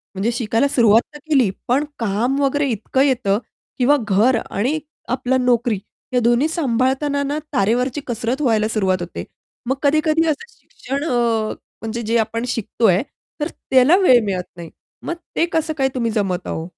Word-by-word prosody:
म्हणजे 210 +5 0
शिकायला 230 +2 +1
सुरुवात 230 -4 +4
तर 295 - -10
केली 260 -9 +4 0.2
पण 265 +5 +2 0.2
काम 230 +6 0
वगैरे 280 +1 +1
इतकं 240 +4 -1
येतं, 245 -8 +2 0.4
किंवा 280 +3 +4
घर 225 +5 +3
आणि 260 +10 -1 0.4
आपला 260 0 0
नोकरी, 245 -2 +2 0.4
हे 250 - +4
दोन्ही 240 +6 +3
सांभाळताना 280 -1 0
ना, 290 +2 -2
तारेवरची 250 +5 +1
कसरत 240 +4 -2
व्हायला 220 -5 +2
सुरुवात 190 -5 0
होते. 175 - -6 0.5
मग 265 - +2
कधी-कधी 310 +2 +3
असं 310 +9 -1
शिक्षण 275 +3 -5
अ, 250 -7 0 0.6
म्हणजे 225 +1 -4
जे 230 +1 0
आपण 230 +1 -1
शिकतोय, 215 -4 +1 0.4
तर 300 - +1 0.2
त्याला 265 +7 +6
वेळ 255 -12 +5
मिळत 185 -2 -2
नाही. 170 -2 -8 0.4
मग 340 - -2 0.2
ते 335 - +3
कसं 320 -1 0
काय 265 -1 +2
तुम्ही 230 -2 0
जमवता 195 -5 -2
हो? 160 +1 -4
245 Hz, 160 wpm, -20 LUFS, 220-280 Hz, 0.6 s, त्याला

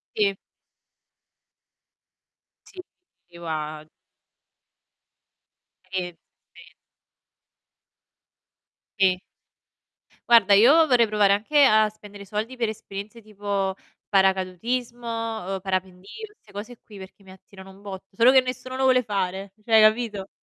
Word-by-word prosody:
Sì. 200 -2 +1 2.3
Sì. 375 - -15 0.5
Io 170 0 -12
a 155 -1 -5 2.1
E 185 -1 -1
e 170 - -21 2.2
Sì. 185 -2 +3 1.1
Guarda, 225 -4 +6
io 280 +11 +6
vorrei 245 -5 +3
provare 210 -2 +3
anche 280 +9 +2
a 215 -2 +4
spendere 205 -1 -13
soldi 215 +5 -5
per 235 -3 -1
esperienze 210 +1 -8
tipo 200 -2 -3 0.3
paracadutismo, 200 +6 0 0.5
uhm, - - -5
parapendio, 185 0 -4 0.3
'ste - - -23
cose 220 +4 -8
qui 210 - -15
perché 190 +1 -13
mi 190 - -15
attirano 190 0 -15
un 195 +1 -18
botto. 195 -1 -10
Solo 235 +5 +5
che 265 - +6
nessuno 255 0 -6
lo 265 - -2
vuole 255 -1 +4
fare, 195 -2 -3
cioè 220 -1 +5
capito? 215 -3 +1
205 Hz, 110 wpm, -24 LUFS, 190-230 Hz, 2.3 s, Guarda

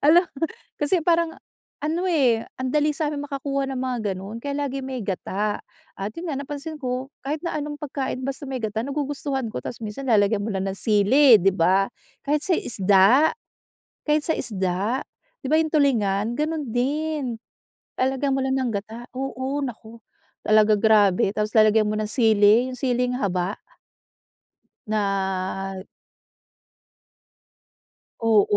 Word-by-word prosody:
Hala. 345 +4 +6 0.5
Kasi 300 +5 +2
parang 335 -1 +2 0.4
ano 330 +5 -1
eh, 250 -8 +3 0.2
ang 260 0 -2
dali 300 0 +3
sa'min 295 -2 -2
makakuha 275 -1 -2
ng 265 - -4
mga 255 -1 -2 0.2
ganon. 200 +5 -7
Kaya 285 0 -3
lagi 275 0 -4
may 260 -4 -5
gata 200 +2 -2 0.3
at 195 +2 -4
yun 345 +1 -5
nga - - -2
napansin 295 +2 -6
ko 255 +2 -3
kahit 295 +4 -3
na 340 - -2
anong 295 0 -5
pagkain 270 -3 -4
basta 275 +1 -4
may 260 -1 -3
gata, 220 -1 -2
nagugustuhan 280 -1 -2
ko, - - -4
tas 235 - -6
minsan 255 +6 -6
lalagyan 205 -1 +3
mo 220 - -3
lang 190 -2 -2
ng 195 - -2
sili, 225 +5 +6
‘di 195 +1 +3
ba? 185 +2 +3 0.4
Kahit 295 +1 +1
sa 350 -2 +2
isda, 205 +8 +4 0.8
kahit 300 0 +2
sa 320 - 0
isda, 200 +4 -1 0.4
'di - - -5
ba 310 - +5
yung 315 -1 0
tulingan, 225 -6 +2
ganun 305 -2 -1
din. 270 -1 -1 0.6
Lalagyan 265 +1 +1
mo 270 - 0
lang 265 - 0
ng 255 -3 0
gata, 220 +4 -6
oo, 270 +1 -3
naku. 230 -2 -7 0.5
Talaga 215 0 +5
grabe. 205 -3 +4
Tapos 210 0 0
lalagyan 215 0 +5
mo 215 - -1
ng 215 - -1
sili, 220 0 +4
yung 255 - -7
siling 250 -1 0
haba. 185 -3 -1 1.3
Na 195 -2 -2 2.4
Oo, 225 -3 +4
250 Hz, 145 wpm, -24 LUFS, 210-285 Hz, 2.4 s, Hala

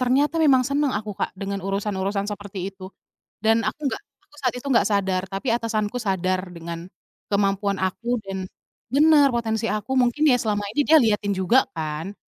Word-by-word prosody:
ternyata 275 +6 +2
memang 265 -4 +5
senang 280 -1 +1
aku, 210 0 -3
Kak, - - -2
dengan 200 0 -3
urusan-urusan 195 0 -1
seperti 205 -1 -6
itu. 190 -1 -13 0.6
Dan 225 +1 +3
aku - - -3
nggak - - -5 0.3
aku - - -24
saat 255 -3 0
itu 250 - -8
nggak 235 - +4
sadar, 190 -2 +1
tapi 195 +7 -4
atasanku 225 -1 -2
sadar 185 -3 0
dengan 170 0 -6 0.5
kemampuan 200 0 +1
aku 235 +5 -1
dan 195 0 -5 0.6
benar, 300 0 +6
potensi 225 -1 -1
aku 210 +3 -3
mungkin 250 +4 +2
ya 250 - +5
selama 210 -3 -1
ini 270 - 0
dia 315 0 +7
liatin 210 -2 +1
juga, 190 +8 +3
kan? 160 +4 -4
210 Hz, 170 wpm, -23 LUFS, 195-245 Hz, 0.6 s, dia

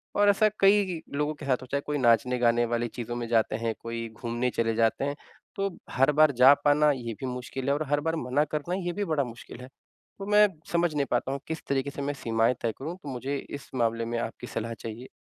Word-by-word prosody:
और 205 0 +5
ऐसा 215 +2 +4
कई 195 -3 +4 0.2
लोगों 150 +1 0
के 145 - -9
साथ 130 -2 +2
हो - - -8
चाहे 140 0 0
कोई 150 0 -1
नाचने-गाने 120 -1 +3
वाली 120 0 -1
चीज़ों 120 +1 -6
में 120 -1 -3
जाते 115 -2 +2
हैं, 115 0 -1
कोई 115 0 -5
घूमने 120 +2 -2
चले 115 -1 0
जाते 115 +4 +2
हैं 145 0 -2 0.4
तो 195 0 0 0.2
हर 135 +3 +3
बार 155 0 +5
जा 130 +2 +7
पाना 150 +1 +5
ये 120 -4 -4
भी 130 - -4
मुश्किल 125 +1 -5
है। - - +4
और 155 - -1
हर 145 0 +2
बार 165 +1 -1
मना 130 +1 +1
करना 160 +4 -1
ये 175 - -1
भी 205 +1 -2
बड़ा 155 -4 +1
मुश्किल 120 0 -10
है। 125 - -9 0.5
तो 195 - -5
मैं 210 0 +7 0.2
समझ 170 -2 +2
नहीं 140 -1 +1
पाता 125 +2 0
हूँ 140 - -3
किस 160 -1 -4
तरीक़े 140 0 0
से 140 - -6
मैं 145 +1 -1
सीमाएँ 115 -2 +1
तय 115 - 0
करूँ, 160 +6 -5
तो 145 - -6
मुझे 135 +2 -3
इस 140 +1 -8
मामले 115 -1 0
में 120 0 -2
आपकी 115 - -5
सलाह 115 +1 -4
चाहिए? 115 +3 -8
130 Hz, 235 wpm, -27 LUFS, 120-150 Hz, 0.5 s, जा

